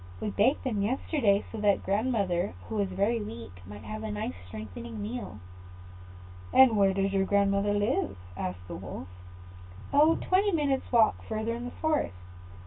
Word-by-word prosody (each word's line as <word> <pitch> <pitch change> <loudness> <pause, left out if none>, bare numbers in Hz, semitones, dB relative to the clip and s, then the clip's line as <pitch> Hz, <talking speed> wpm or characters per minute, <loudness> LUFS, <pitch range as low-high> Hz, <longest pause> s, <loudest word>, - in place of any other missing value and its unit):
"We 210 - -2
baked 250 +9 +2
the 260 - -1
meat 205 -2 0
yesterday, 235 -5 +1
so 225 - -5
that 205 -1 +2
grandmother, 200 - 0
who 215 - -3
is 200 -1 +1
very 200 +5 +1
weak, 115 - -8
might 105 +1 -9
have 105 0 -6
a 110 - -4
nice 105 -4 -3
strengthening 110 +3 -7
meal." 105 0 -5 1.1
"And 260 -4 +7
where 195 -2 +4
does 195 0 0
your 195 -1 +2
grandmother 200 +1 +2
live?" 205 - 0 0.2
asked 90 -1 -5
the - - -6
Wolf. 85 - -7 0.9
"Oh, 305 +3 +6
quite - - -6
twenty 390 +2 +3
minutes 285 -4 0
walk 230 -3 +4
further 220 +1 -1
in 240 +1 -5
the 245 - -5
forest. 310 - 0
200 Hz, 170 wpm, -29 LUFS, -, 1.1 s, And